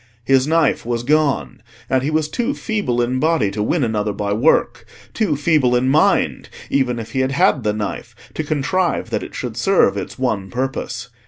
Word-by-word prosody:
His 135 0 +3
knife 160 -2 +2
was 120 0 -2
gone, 140 - 0 0.3
and 130 -1 +1
he 140 - -1
was 155 -1 0
too 240 - -2
feeble 165 - -1
in 125 +2 -1
body 155 -9 +1
to 105 +1 -3
win 140 +8 +1
another 105 -2 -1
by 100 0 -2
work, 125 +10 +1 0.3
too 215 -9 0
feeble 145 -4 +2
in 125 +1 +2
mind, 150 +3 +2 0.2
even 130 -3 +1
if 115 -1 -7
he 135 - -2
had 130 +1 0
had 170 -3 +3
the 105 - 0
knife, 105 -1 -5 0.2
to 155 - -3
contrive 160 +5 -1
that - - -1
it - - -9
should - - -5
serve - - +2
its - - -6
one 110 -7 -1
purpose. 125 -1 -4
130 Hz, 190 wpm, -19 LUFS, 120-155 Hz, 0.3 s, His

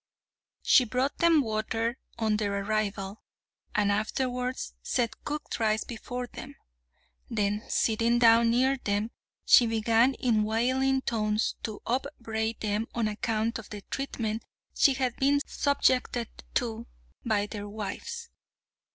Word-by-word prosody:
She 255 - +6
brought 250 +4 -1
them 335 -3 +5
water 225 +2 -1 0.2
on 220 -2 +1
their 200 -2 -1
arrival, 205 -1 -2 0.5
and 205 -2 +3
afterwards 250 +4 -2
set 235 -3 -1
cooked 295 -3 -4
rice 220 -1 +2
before 245 +1 -5
them. - - -10 0.7
Then 210 -2 0
sitting 230 +1 +2
down 230 -1 +6
near 260 +3 +3
them, 210 -1 -1 0.3
she 240 - +7
began 225 +3 +3
in 225 -4 +2
wailing 260 +5 +1
tones 215 -1 0
to 215 -2 -6
upbraid 230 -4 -2
them 215 +1 -1
on 230 -2 +1
account 225 +1 -1
of 225 - -11
the 210 -1 -7
treatment 230 -5 -3 0.3
she 275 - +4
had 255 -2 -1
been 280 +1 +3
subjected 255 -4 +1 0.3
to 230 -2 -1 0.4
by 210 -3 +1
their 205 -1 -6
wives. 465 - -6
230 Hz, 125 wpm, -28 LUFS, 215-250 Hz, 0.7 s, she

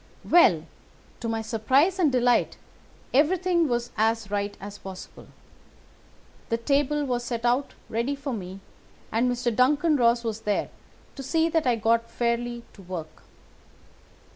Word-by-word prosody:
"Well, 185 - +5 0.6
to 235 - -4
my 225 0 -2
surprise 260 - +2
and 315 -6 +3
delight, 245 -1 +2 0.6
everything 340 +4 +3
was 240 -1 -2
as 220 -1 0
right 205 0 -2
as 205 +1 -9
possible. 190 -1 -10 1.2
The 230 - +1
table 285 +4 +1
was 245 -2 -1
set 235 -1 -4
out 250 +4 +1
ready 235 +6 -1
for 280 -1 -5
me, 190 -2 -7 0.5
and 235 +3 +1
Mr. 245 -2 -1
Duncan 295 +5 +3
Ross 235 -1 +3
was 225 -1 -3
there 210 -2 -1 0.4
to 275 - -7
see 320 +5 +1
that 325 -4 0
I 245 - +3
got 230 +1 +1
fairly 235 0 -2
to 200 - -14
work. 170 -4 -8
240 Hz, 140 wpm, -26 LUFS, 220-280 Hz, 1.2 s, Well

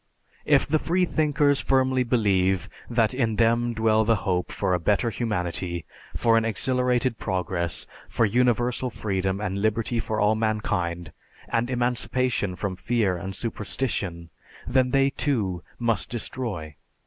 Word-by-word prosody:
If - - +4
the 155 +1 +1
freethinkers 150 -5 +2
firmly 130 -1 +2
believe 100 -6 +2 0.2
that 115 -2 +2
in 115 -4 0
them 115 +1 +2
dwell 110 -1 +3
the 115 +1 +3
hope 90 -2 0
for 95 -2 0
a 90 - +1
better 105 +7 +1
humanity, 90 -6 -2 0.3
for 115 -1 +4
an - - -2
exhilarated 125 +1 +1
progress, 90 -3 -1 0.2
for 115 - +2
universal 120 +2 +1
freedom 95 -4 -2
and 100 -1 -2
liberty 110 +3 0
for 110 -1 -2
all 105 +1 +4
mankind, 90 -6 -1 0.4
and 115 +1 0
emancipation 125 -4 0
from 95 0 -3
fear 110 -3 +1
and 95 +2 -6
superstition, 100 -6 -3 0.3
then 130 -1 +2
they, 135 +1 +3
too, 105 - -1 0.2
must 115 -8 0
destroy. 105 - -5
110 Hz, 135 wpm, -25 LUFS, 95-125 Hz, 0.4 s, If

